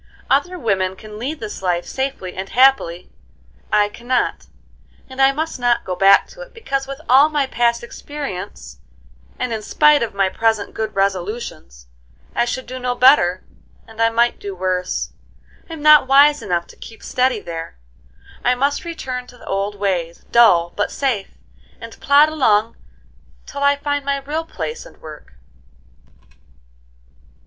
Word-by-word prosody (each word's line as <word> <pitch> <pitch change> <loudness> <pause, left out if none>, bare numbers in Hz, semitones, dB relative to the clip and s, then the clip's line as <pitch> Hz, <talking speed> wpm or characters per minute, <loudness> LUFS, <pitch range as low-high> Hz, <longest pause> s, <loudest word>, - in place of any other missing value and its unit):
Other 325 +7 +1
women 190 - -1
can 210 +2 -11
lead 285 +7 -4
this 215 -4 -7
life 175 -2 -1
safely 265 -9 -4
and 190 +1 -6
happily: 250 -10 +2 0.6
I 210 -1 +3
cannot, 240 +4 -2 0.6
and 260 0 -5
I 270 0 +6
must 315 0 -4
not 245 -1 +1
go 185 - -3
back 195 +2 +5
to - - -13
it, - - -12
because, 275 -12 -3
with 275 0 -7
all 270 +5 +6
my 295 -2 0
past 235 -2 0
experience, 200 - -8 0.6
and 240 - -3
in 220 - -3
spite 300 +6 +4
of 230 - -2
all - - -17
my 195 -1 +3
present 220 +1 0
good 220 -1 -4
resolutions, 190 - -3 0.5
I 240 - +1
should 260 +1 -4
do 255 +1 -7
no 250 -1 -2
better, 245 -9 +4 0.4
and 225 0 -8
I 230 - +4
might 235 +1 +1
do 200 -1 -6
worse. 185 0 -2 0.6
I'm 320 -2 -8
not 300 -3 +7
wise 285 +2 +5
enough 175 -2 -2
to - - -14
keep 225 - -13
steady 255 -2 0
there; 165 - -7 0.7
I 250 +1 +3
must 280 +3 0
return 255 -7 -5
to 250 - -15
the - - -15
old 200 +1 -2
ways, 180 -4 -3
dull 175 -8 +5
but 205 - -1
safe, 235 - -3 0.4
and 230 -1 -11
plod 285 +2 +5
along 230 -8 +1 0.7
till 280 - -8
I 280 0 +4
find 285 0 -2
my 280 0 -1
real 300 +4 -4
place 465 +7 -6
and - - -16
work." 150 - -12
235 Hz, 160 wpm, -19 LUFS, 195-275 Hz, 0.7 s, not